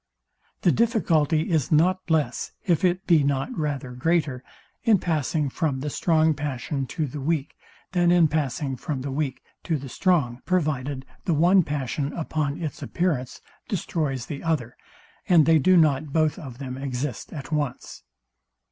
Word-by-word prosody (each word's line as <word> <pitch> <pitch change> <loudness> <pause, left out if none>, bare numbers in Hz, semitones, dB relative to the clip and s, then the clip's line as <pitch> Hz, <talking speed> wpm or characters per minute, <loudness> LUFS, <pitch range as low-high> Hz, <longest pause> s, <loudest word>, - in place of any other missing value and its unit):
The 175 - +4
difficulty 170 - +2
is 155 -6 +1
not 180 +4 +2
less, 150 -6 0
if 170 -3 +2
it 185 +1 +1
be 165 -5 +4
not 140 - -1
rather 145 - -3
greater, 140 -1 0 0.4
in 225 -4 +4
passing 155 -3 0
from 140 -1 -1
the 150 +1 -3
strong 160 0 +3
passion 140 -1 -3
to 160 +2 -2
the 145 +1 -6
weak, 150 0 -1 0.4
than 175 -1 +3
in 175 -2 +5
passing 140 -3 -2
from 135 +1 -4
the 135 +1 -4
weak 135 -2 -2 0.2
to 160 - -1
the 135 -1 -8
strong, 135 -7 +1
provided 145 -6 -1 0.2
the 170 - +2
one 180 +5 +5
passion 145 -2 -3
upon 155 -2 -2
its 155 -5 -5
appearance 150 -8 -2 0.3
destroys 150 - -2
the 140 - -6
other, 150 -8 -1 0.5
and 165 -5 +6
they 160 -1 +5
do 185 +6 +5
not 150 -2 +3
both 155 0 +1
of 130 -6 -9
them 130 -1 -6
exist 130 -2 -4
at 145 -1 -7
once. 145 -5 -3
150 Hz, 155 wpm, -25 LUFS, 135-165 Hz, 0.5 s, and